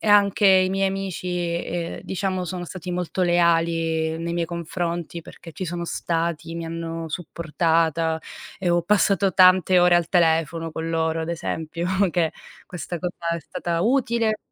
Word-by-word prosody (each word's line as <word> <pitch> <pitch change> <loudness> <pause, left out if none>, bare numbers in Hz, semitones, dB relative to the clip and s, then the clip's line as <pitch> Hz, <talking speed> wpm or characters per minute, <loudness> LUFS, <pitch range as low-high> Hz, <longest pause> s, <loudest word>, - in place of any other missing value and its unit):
e - - -6
anche 205 0 +5
i 185 -1 +5
miei 195 0 +1
amici, 195 -2 -4
e, 175 -1 -2
ehm, - - -9
diciamo 190 -1 -2
sono 180 0 -5
stati 180 0 -6
molto 180 +1 -2
leali 165 -2 +2
nei 170 0 -3
miei 170 -1 -1
confronti 170 0 -4
perché 165 - -12
ci 185 - -6
sono 170 0 -4
stati, 165 -1 -2
mi 170 0 -4
hanno 165 0 -5
supportata 165 -1 0 0.4
e 180 -2 +1
ho 175 0 +2
passato 200 +1 +2
tante 185 -1 +6
ore 175 0 +6
al 170 -1 0
telefono 165 -1 +2
con 160 +1 -4
loro, 160 0 0
ad 160 - -5
esempio 165 0 -3 0.2
che 165 -3 +1 0.3
questa 175 -1 -6
cosa 180 -1 -4 0.2
è 170 - -4
stata 170 +2 -3
utile. 235 -3 +1
170 Hz, 160 wpm, -23 LUFS, 165-185 Hz, 0.4 s, tante